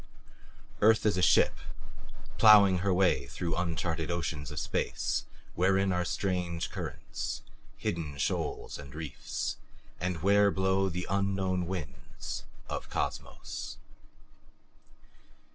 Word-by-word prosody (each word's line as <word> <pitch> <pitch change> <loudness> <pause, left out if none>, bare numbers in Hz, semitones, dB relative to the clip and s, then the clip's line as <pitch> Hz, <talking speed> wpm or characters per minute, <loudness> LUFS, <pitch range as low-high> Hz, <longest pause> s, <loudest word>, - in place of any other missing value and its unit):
Earth 110 +1 +5
is 105 - +3
a 90 - 0
ship, - - +4 0.8
plowing 100 -4 +8
her 100 +2 +1
way 90 0 +3
through 85 -2 -3
uncharted 85 -2 -1
oceans 80 -4 -2
of 75 - -4
space - - -1 0.3
wherein 95 +2 +3
are 90 0 +1
strange 90 -2 -2
currents, - - -5 0.3
hidden 75 -4 -3
shoals 70 - -2
and 70 -1 -10
reefs, 75 -5 -4 0.4
and 90 -3 -2
where 100 +1 +5
blow 95 0 +1
the 90 +1 -3
unknown 95 -2 0
winds 85 -9 -6 0.2
of - - -5
Cosmos. - - -4
90 Hz, 110 wpm, -30 LUFS, 85-95 Hz, 0.8 s, plowing